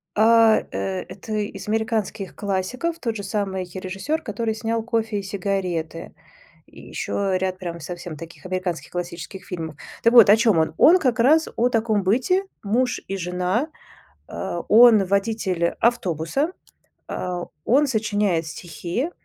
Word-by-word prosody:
а, 225 Hz, 0 st, +6 dB
э, 95 Hz, -1 st, -3 dB
это 220 Hz, -, -8 dB
из 205 Hz, -2 st, -3 dB
американских 220 Hz, -3 st, -2 dB
классиков, 205 Hz, -, -2 dB
тот 230 Hz, -3 st, -2 dB
же 205 Hz, -, -5 dB
самый 195 Hz, -2 st, -2 dB
режиссер, 190 Hz, -, -3 dB
который 220 Hz, 0 st, -2 dB
снял 225 Hz, 0 st, -2 dB
"Кофе 225 Hz, -2 st, -1 dB
и -, -, -6 dB
сигареты" 185 Hz, -4 st, -3 dB, 0.5 s
и -, -, -14 dB
еще 195 Hz, -2 st, -1 dB
ряд 185 Hz, 0 st, -2 dB
прям 170 Hz, -2 st, -5 dB
совсем 175 Hz, +1 st, -7 dB
таких 165 Hz, +3 st, -11 dB
американских 185 Hz, -2 st, -3 dB
классических 175 Hz, +2 st, -6 dB
фильмов. 160 Hz, -4 st, -5 dB, 0.3 s
Так 230 Hz, -, +4 dB
вот 235 Hz, -5 st, +9 dB
о 210 Hz, -, +8 dB
чём 220 Hz, -5 st, +3 dB
он. 160 Hz, 0 st, +1 dB
Он 360 Hz, +3 st, +7 dB
как 250 Hz, -5 st, 0 dB
раз 310 Hz, +7 st, +5 dB
о 245 Hz, +2 st, +2 dB
таком 220 Hz, -3 st, +1 dB
быте: 255 Hz, -, +2 dB, 0.2 s
муж 245 Hz, +5 st, +1 dB
и 195 Hz, -, -3 dB
жена, 180 Hz, -, -1 dB, 0.6 s
э, 170 Hz, -, -4 dB
он- 220 Hz, -2 st, +7 dB
водитель 195 Hz, -3 st, 0 dB
автобуса, 230 Hz, -, 0 dB, 0.6 s
э, 180 Hz, -1 st, -3 dB, 0.2 s
он 280 Hz, +5 st, +4 dB
сочиняет 205 Hz, -8 st, 0 dB
стихи, 175 Hz, -, -4 dB
200 Hz, 145 wpm, -23 LUFS, 180-230 Hz, 0.6 s, вот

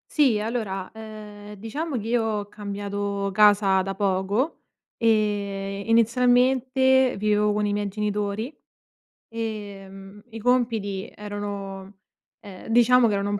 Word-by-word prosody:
Sì, 265 Hz, -8 st, +4 dB
allora, 210 Hz, -4 st, -3 dB
ehm, 210 Hz, -1 st, -10 dB
diciamo 260 Hz, +10 st, -5 dB
che 220 Hz, 0 st, -4 dB
io 240 Hz, 0 st, +2 dB
ho 210 Hz, -2 st, -2 dB
cambiato 200 Hz, -1 st, -3 dB
casa 205 Hz, -2 st, +5 dB
da 195 Hz, +1 st, -4 dB
poco 200 Hz, -, -1 dB, 0.3 s
e 200 Hz, -3 st, 0 dB
inizialmente 250 Hz, +3 st, +3 dB
vivevo 210 Hz, 0 st, +2 dB
con 210 Hz, 0 st, 0 dB
i 205 Hz, -, 0 dB
miei 205 Hz, 0 st, -1 dB
genitori. 210 Hz, +4 st, -2 dB, 0.7 s
Ehm, 205 Hz, -3 st, -7 dB
i 225 Hz, 0 st, -8 dB
compiti 225 Hz, -5 st, 0 dB
erano 200 Hz, -1 st, -6 dB, 0.4 s
ehm, 190 Hz, -2 st, -11 dB
diciamo 240 Hz, +1 st, +5 dB
che -, -, 0 dB
erano 200 Hz, 0 st, -1 dB
un 205 Hz, -, -1 dB
210 Hz, 120 wpm, -24 LUFS, 200-230 Hz, 0.7 s, casa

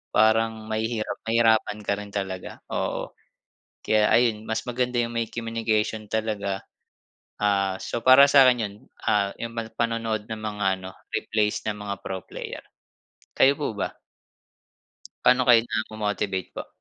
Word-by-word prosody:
parang 110 Hz, 0 st, +3 dB
mahihirap 110 Hz, 0 st, -2 dB
mahirapan 110 Hz, -2 st, +3 dB
ka -, -, 0 dB
rin 105 Hz, -, -7 dB
talaga, 95 Hz, -2 st, -4 dB
oo. -, -, -2 dB, 0.7 s
Kaya 110 Hz, -1 st, +3 dB
ayun 115 Hz, -3 st, +3 dB
mas 110 Hz, -, -1 dB
maganda 125 Hz, 0 st, -1 dB
'yung 120 Hz, 0 st, -2 dB
may 115 Hz, -1 st, -1 dB
communication 110 Hz, -2 st, -1 dB
talaga. 105 Hz, -3 st, -2 dB, 0.8 s
Ah, 100 Hz, -2 st, +2 dB
so 120 Hz, -, -3 dB
para 130 Hz, +2 st, +9 dB
sa'kin 130 Hz, -4 st, +6 dB
'yun, 100 Hz, -1 st, -4 dB, 0.3 s
ah, 100 Hz, -1 st, +2 dB
'yung 115 Hz, -, -4 dB
pan 115 Hz, -1 st, -2 dB
panonood 115 Hz, -2 st, -1 dB
ng 110 Hz, -, -4 dB
mga 105 Hz, -1 st, -3 dB, 0.2 s
ano 95 Hz, 0 st, -9 dB, 0.2 s
replays 105 Hz, -1 st, 0 dB
ng 105 Hz, -, -1 dB
mga 100 Hz, -1 st, -3 dB
pro 95 Hz, -1 st, -5 dB
player. -, -, -7 dB, 0.7 s
Kayo 140 Hz, +1 st, +6 dB
po 140 Hz, -7 st, -2 dB
ba? -, -, -2 dB, 1.3 s
Paano 125 Hz, 0 st, +4 dB
kayo 115 Hz, -2 st, +7 dB
namo-motivate 105 Hz, -4 st, -2 dB
po? -, -, -7 dB
110 Hz, 140 wpm, -25 LUFS, 105-115 Hz, 1.3 s, para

